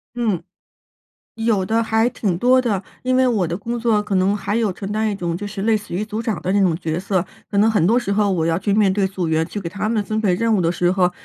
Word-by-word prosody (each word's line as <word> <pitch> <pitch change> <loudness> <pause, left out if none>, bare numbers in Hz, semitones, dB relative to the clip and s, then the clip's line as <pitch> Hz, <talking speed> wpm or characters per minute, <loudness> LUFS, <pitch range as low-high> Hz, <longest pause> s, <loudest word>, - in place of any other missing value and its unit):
嗯。 225 -7 -1 0.9
有 225 -4 +1
的， 225 +4 +1
还 225 +1 +2
挺 200 -7 -1
多 255 +6 +4
的。 210 -6 -1 0.2
因 255 0 +1
为 260 0 +4
我 215 -8 +1
的 170 +1 -3
工 235 +3 -4
作 225 -3 +2
可 205 -1 -3
能 190 +2 +2
还 205 +1 -2
有 225 -3 +1
承 195 +2 -6
担 215 0 0
一 - - -2
种 175 -3 -3
就 200 +4 -4
是 200 -1 -5
类 225 +1 +3
似 205 -4 -4
于 200 +4 -1
组 215 +1 -4
长 225 -4 -3
的 185 - -1
那 200 - +3
种 180 -4 +2
角 165 -1 -3
色。 185 -1 0 0.3
可 200 - -3
能 215 +2 +5
很 190 -6 +2
多 235 +4 +4
时 200 -5 -2
候 205 -1 +2
我 170 -4 0
要 165 0 +1
去 200 +1 0
面 205 -3 +3
对 195 -1 +1
组 185 -2 -3
员， 160 0 +1
去 195 - -6
给 195 - -6
他 200 +5 -3
们 215 -2 0
分 215 +1 -2
配 200 -4 +2
任 225 +4 +1
务 195 - +2
的 165 -1 +2
时 175 +1 +1
候， 180 -2 +2
205 Hz, 305 characters per minute, -20 LUFS, 185-220 Hz, 0.9 s, 能